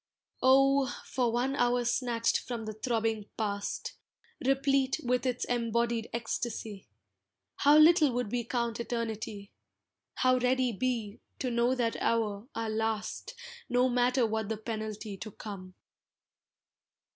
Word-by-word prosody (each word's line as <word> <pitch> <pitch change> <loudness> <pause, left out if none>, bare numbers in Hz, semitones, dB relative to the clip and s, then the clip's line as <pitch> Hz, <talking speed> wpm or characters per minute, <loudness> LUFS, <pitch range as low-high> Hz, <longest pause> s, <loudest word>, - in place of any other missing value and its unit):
Oh! 270 +1 +5 0.2
for 245 -3 0
one 250 +4 0
hour 245 -1 +2
snatched 235 -1 +1
from 235 -3 -5
the 215 - -4
throbbing 220 -1 -1
past, 205 -2 -3 0.5
Replete 270 +1 +2
with 250 +1 +1
its 250 -1 -1
embodied 235 -1 0
ecstasy! 225 - -4 0.7
How 290 +1 +6
little 310 -2 +7
would 245 -4 -2
we 245 -1 0
count 235 -1 -2
Eternity, 220 -4 -4 0.6
How 255 0 +3
ready 250 0 +2
be, 225 -2 -2 0.2
to 255 - -2
know 240 +2 +2
that 235 -2 -1
hour, 215 -1 0
our 225 0 -2
last, 220 - -2 0.3
No 250 +1 +3
matter 245 0 +2
what 220 -1 -2
the 220 - -2
penalty 215 -2 -5
to 215 - -7
come. 185 -3 -9
235 Hz, 125 wpm, -30 LUFS, 220-255 Hz, 0.7 s, little